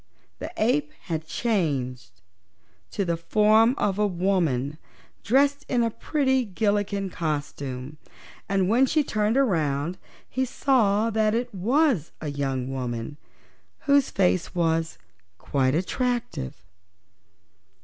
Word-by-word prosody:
The - - -5
ape 275 +7 +1
had 160 -2 -4
changed 130 - -2 0.7
to 200 - -2
the 170 -1 0
form 215 +7 +4
of 200 0 0
a 210 - +3
woman, 170 -7 0 0.4
dressed 280 +4 +3
in 245 -2 +2
the 230 -1 +1
pretty 265 0 +1
Gillikin 205 -2 -1
costume, 145 -3 -4 0.5
and 195 -2 +2
when 245 +6 +4
she 305 +3 +2
turned 215 -1 0
around 165 - +1 0.3
he 260 - -1
saw 230 -4 +2
that 215 0 +2
it 240 0 -2
was 230 - +1
a 150 - -4
young 135 -3 -2
woman, 125 0 -4 0.6
whose 280 -2 +3
face 185 -2 +1
was 165 -1 0 0.4
quite 130 +4 0
attractive. 190 - -2
195 Hz, 115 wpm, -25 LUFS, 150-235 Hz, 0.7 s, form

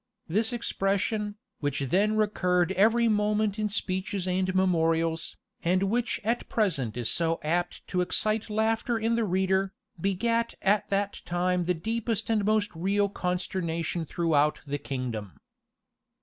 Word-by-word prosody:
This 215 +8 +1
expression, 210 -2 -1 0.2
which 145 -1 -1
then 195 +11 +2
recurred 180 -4 +2
every 225 +5 +4
moment 210 -1 +1
in 210 0 0
speeches 190 -1 -2
and 185 0 0
memorials, 165 -3 +1 0.3
and 185 +3 +2
which 230 +5 0
at 230 +3 -1
present 145 - 0
is 120 -2 -1
so 165 +3 +1
apt 175 +3 -1
to 180 - +1
excite 215 +4 0
laughter 225 +2 +1
in 225 +1 0
the 230 -1 +1
reader, 190 0 +1 0.3
begat 230 +5 0
at 200 +1 +2
that 200 0 -1
time 180 0 0
the 180 +1 +1
deepest 225 +4 -2
and 215 -2 +2
most 215 0 +2
real 200 +4 +1
consternation 180 -3 -2
throughout 150 -2 +1
the 145 0 -3
kingdom. 120 -8 -4
190 Hz, 135 wpm, -28 LUFS, 170-215 Hz, 0.3 s, every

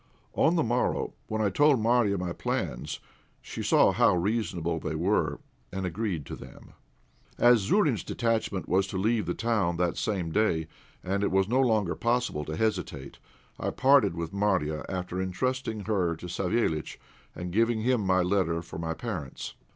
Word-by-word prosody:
On 165 - +3
the 165 - +2
morrow, 120 +2 0
when 110 0 -1
I 100 - +1
told 145 +3 +4
Marya 115 -3 +2
my 90 -1 -3
plans, - - -3 0.4
she - - -7
saw - - +4
how - - +4
reasonable 85 -4 -1
they 80 0 -4
were, 90 +7 +1 0.3
and 95 0 -3
agreed 90 -4 -2
to - - -6
them. - - -13 0.6
As 120 -1 +6
Zourine's 125 - +2
detachment 115 -5 -1
was 95 +1 +2
to 95 - -4
leave 110 +3 +1
the - - -1
town 105 -7 0
that 90 -1 0
same 95 -7 -1
day, 80 -5 +1 0.4
and 100 +2 -1
it - - +2
was 95 0 +2
no 125 +4 +2
longer 110 -8 +2
possible 120 -10 0
to 80 - -4
hesitate, 90 -11 -2 0.4
I - - -1
parted 130 -9 +4
with 85 0 -4
Marya 95 -7 0
after 90 -1 -3
entrusting 115 +4 -2
her 95 -5 0
to 80 - -10
Savéliitch, 90 -2 -1 0.4
and 90 +1 -5
giving 115 +1 +2
him 115 -5 +1
a 95 -1 +4
letter 90 -3 0
for 85 - -8
my 80 -1 -3
parents. 90 - -5
100 Hz, 165 wpm, -28 LUFS, 85-115 Hz, 0.6 s, As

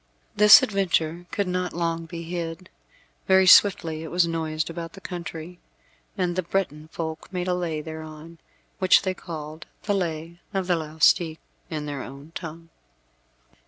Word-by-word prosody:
This 210 0 +9
adventure 175 -4 0
could 200 -2 -1
not 180 0 -2
long 165 -1 -2
be 170 0 -7
hid. 170 +1 -5 0.6
Very 190 0 +5
swiftly 170 -4 +5
it 160 - -6
was 175 0 +3
noised 160 -2 -2
about 165 -1 -6
the 195 - -11
country, 175 -1 -7 0.6
and 180 -2 0
the 185 - +1
Breton 165 -4 -2
folk 160 0 -6
made 180 -1 -3
a 180 - +2
Lay 170 -4 -2
thereon, 160 +1 -9 0.4
which 185 -1 +5
they 190 -1 0
called 155 -3 -8 0.2
the 205 - 0
Lay 170 -2 -3 0.2
of 190 -1 0
the 180 -1 +2
Laustic, 160 +1 +2 0.3
in 150 -2 -4
their 145 -2 -4
own 140 +4 -10
tongue. 165 0 -8
165 Hz, 155 wpm, -25 LUFS, 160-180 Hz, 0.6 s, This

